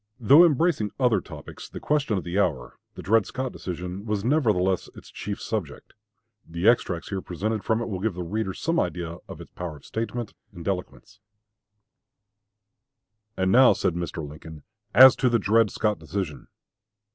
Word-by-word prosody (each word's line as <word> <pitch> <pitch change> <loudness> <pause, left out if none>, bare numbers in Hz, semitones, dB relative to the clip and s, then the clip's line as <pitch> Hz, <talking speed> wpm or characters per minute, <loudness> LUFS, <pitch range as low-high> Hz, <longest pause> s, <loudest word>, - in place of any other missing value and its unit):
Though 140 +8 +7
embracing 160 -8 +2
other 120 -7 +3
topics, - - -11
the - - -8
question 140 -8 0
of 95 - -3
the 90 +3 -2
hour, 75 -11 -1 0.2
the - - -9
Dred 110 +1 +3
Scott 130 0 -4
decision, 90 +2 -6
was 105 -2 -1
nevertheless 105 - +1
its - - -13
chief 105 -1 -5
subject. 95 -10 -5 0.5
The 85 +4 -3
extracts 95 -8 +2
here 95 -2 -3
presented 105 +5 -3
from 110 +1 0
it - - -5
will 95 -5 -4
give 105 -1 -2
the 90 - -4
reader 95 +1 -3
some 165 +1 -1
idea 85 -1 -3
of - - -9
its - - -12
power 90 -3 -6
of - - -19
statement 115 0 -4 0.2
and 85 -1 -9
eloquence: 90 - -5 2.2
And 95 0 +1
now 130 +3 +7
[said 95 -3 -1
Mr. 85 -3 -5
Lincoln] 75 0 -11 0.3
as 130 +4 +9
to 125 - +2
the 120 - +3
Dred 110 +1 +3
Scott 105 0 -1
decision. 85 -9 -5
100 Hz, 170 wpm, -25 LUFS, 90-115 Hz, 2.2 s, as